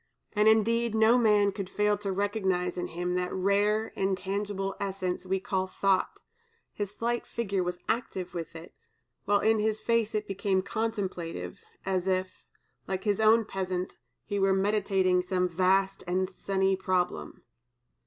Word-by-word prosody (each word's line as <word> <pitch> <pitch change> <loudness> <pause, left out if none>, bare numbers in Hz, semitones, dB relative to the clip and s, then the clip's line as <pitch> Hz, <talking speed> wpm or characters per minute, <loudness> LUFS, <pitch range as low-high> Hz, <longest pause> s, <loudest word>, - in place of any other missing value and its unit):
And, 210 0 +3
indeed, 225 +1 +3
no 220 +2 +5
man 210 -3 +4
could 195 -2 -5
fail 210 +1 +2
to 200 -1 -3
recognize 190 -3 0
in 180 - -3
him 175 +2 -3
that 180 0 -1
rare 205 +3 +1
intangible 195 +1 -2
essence 185 -2 -3
we 190 +1 +1
call 190 0 -1
thought; 190 0 0 0.5
his 205 -2 -3
slight 235 +1 -2
figure 200 -5 -1
was 180 0 -3
active 210 -6 -2
with 165 -2 -6
it, 165 +1 -10 0.5
while 205 0 +3
in 220 0 +3
his 215 0 0
face 230 -2 +1
it 210 0 -1
became 195 -1 0
contemplative, 200 -5 -3 0.3
as 190 -1 -1
if, 185 0 -1 0.4
like 190 0 -3
his 205 -2 +1
own 220 +1 +5
peasant, 185 -2 -3 0.3
he 205 -2 -2
were 195 0 +3
"meditating 190 -2 +2
some 180 0 0
vast 190 +2 +1
and 185 +1 0
sunny 190 0 0
problem." 180 - -2
195 Hz, 150 wpm, -29 LUFS, 185-210 Hz, 0.5 s, no